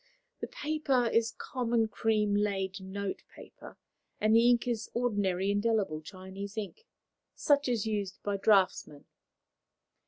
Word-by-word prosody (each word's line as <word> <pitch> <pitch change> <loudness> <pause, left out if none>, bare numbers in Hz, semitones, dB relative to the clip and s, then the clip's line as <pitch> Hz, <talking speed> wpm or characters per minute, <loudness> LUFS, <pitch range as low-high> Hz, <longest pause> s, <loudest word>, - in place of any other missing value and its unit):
The - - -4
paper 300 - 0
is 230 0 +1
common 235 -3 0
cream 215 -2 +1
laid 195 -2 -1
notepaper, 195 +1 -8 0.4
and 215 +1 +3
the 235 +1 +6
ink 240 0 +2
is 230 -3 -2
ordinary 200 -5 0
indelible 205 -6 0
Chinese 190 +4 -9
ink, 220 - -6 0.5
such 285 -2 +2
as 235 -3 +1
is - - -3
used 205 -3 -3
by 205 -1 -1
draughtsmen. 190 -8 +2
215 Hz, 125 wpm, -30 LUFS, 195-235 Hz, 0.5 s, the